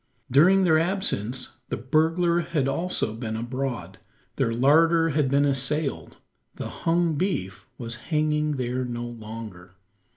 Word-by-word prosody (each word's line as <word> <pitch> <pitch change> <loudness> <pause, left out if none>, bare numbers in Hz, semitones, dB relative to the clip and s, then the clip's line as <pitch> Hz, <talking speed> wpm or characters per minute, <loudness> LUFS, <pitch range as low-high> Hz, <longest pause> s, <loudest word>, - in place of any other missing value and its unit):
During 180 +9 +5
their 160 -3 +4
absence, 130 - -2
the - - -2
burglar 165 - +2
had 155 -5 -1
also 165 -4 -1
been 110 -1 -4
abroad. 120 -6 -4 0.4
Their 115 - +1
larder 165 +7 +4
had 150 -3 +1
been 140 +1 +3
assailed. 140 +1 -1 0.4
The - - -5
hung 170 0 0
beef 95 - -2
was 115 -1 -5
hanging 150 -1 +1
there 130 -1 -2
no 120 -1 -4
longer. 110 -6 -9
135 Hz, 130 wpm, -25 LUFS, 120-165 Hz, 0.4 s, During